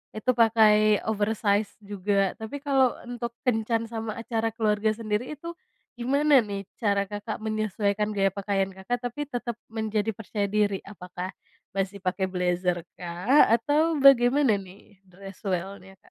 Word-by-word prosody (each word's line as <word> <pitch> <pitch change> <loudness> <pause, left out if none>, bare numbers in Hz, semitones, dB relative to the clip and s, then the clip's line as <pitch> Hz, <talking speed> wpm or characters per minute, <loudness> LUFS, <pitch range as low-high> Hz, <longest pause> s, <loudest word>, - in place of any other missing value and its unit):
itu 215 +4 +1
pakai 215 -2 +5
oversize 210 -1 +1
juga. 200 -1 -1
Tapi 220 +6 -7
kalau 270 -3 +3 0.2
untuk 240 -1 -4 0.2
kencan 225 -1 +1
sama 225 -1 -5
acara 225 -1 -1
keluarga 215 -1 +1
sendiri, 215 +3 -3
itu 335 +4 -8 0.4
gimana 280 +3 +4
nih 200 -1 -5 0.2
cara 200 -2 +2
Kakak 205 +2 -5
menyesuaikan 215 -1 -1
gaya 195 0 +3
pakaian 195 -1 -1
Kakak, 220 +6 -3
tapi 290 +3 -5
tetap 240 -2 -3 0.2
menjadi 220 -1 -1
percaya 205 -1 -3
diri? 205 -2 +1
Apakah 180 -2 -7 0.5
masih 195 0 -2
pakai 190 +1 -1
blazer, 180 -1 0 0.2
kah? 180 +11 +3
Atau 295 +6 +2
bagaimana 260 -3 +6
nih. 195 +1 -13
Dress 195 +2 -13
well-nya, 190 +1 -4
Kak? - - -23
215 Hz, 140 wpm, -26 LUFS, 195-235 Hz, 0.5 s, bagaimana